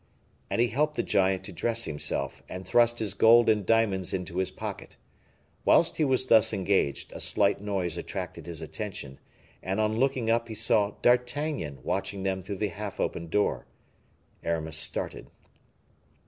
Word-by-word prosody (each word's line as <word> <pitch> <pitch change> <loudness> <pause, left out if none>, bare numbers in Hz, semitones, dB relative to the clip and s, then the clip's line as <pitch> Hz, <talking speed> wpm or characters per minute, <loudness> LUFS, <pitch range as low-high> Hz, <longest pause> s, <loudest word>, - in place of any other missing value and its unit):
And - - -1
he 120 0 +3
helped 150 +6 0
the - - 0
giant 95 -1 +1
to 95 - -8
dress 115 0 -1
himself, 70 -2 -3
and 90 +1 -7
thrust 120 0 +3
his 105 -4 -2
gold 115 +3 +6
and 105 -2 0
diamonds 100 -3 +1
into 90 -1 -5
his 95 0 0
pocket. - - -8 0.7
Whilst - - +4
he 160 - +2
was 130 -2 +2
thus 115 -3 +5
engaged, 95 -7 0
a - - -7
slight 100 -1 +2
noise 95 -5 -2
attracted 90 -2 -6
his 80 -2 -5
attention, 80 -7 -6 0.4
and 95 +2 -2
on 110 +1 +1
looking 130 -3 +1
up, 115 +1 +1
he 110 - -7
saw 105 -2 +2
D'Artagnan 125 - 0
watching 95 +3 -3
them 95 -1 -1
through 100 +3 -5
the 105 +2 -1
half 105 0 -7
opened 85 0 -2
door. 105 +5 0 0.8
Aramis 80 -2 0
started. - - 0
100 Hz, 160 wpm, -28 LUFS, 90-115 Hz, 0.8 s, gold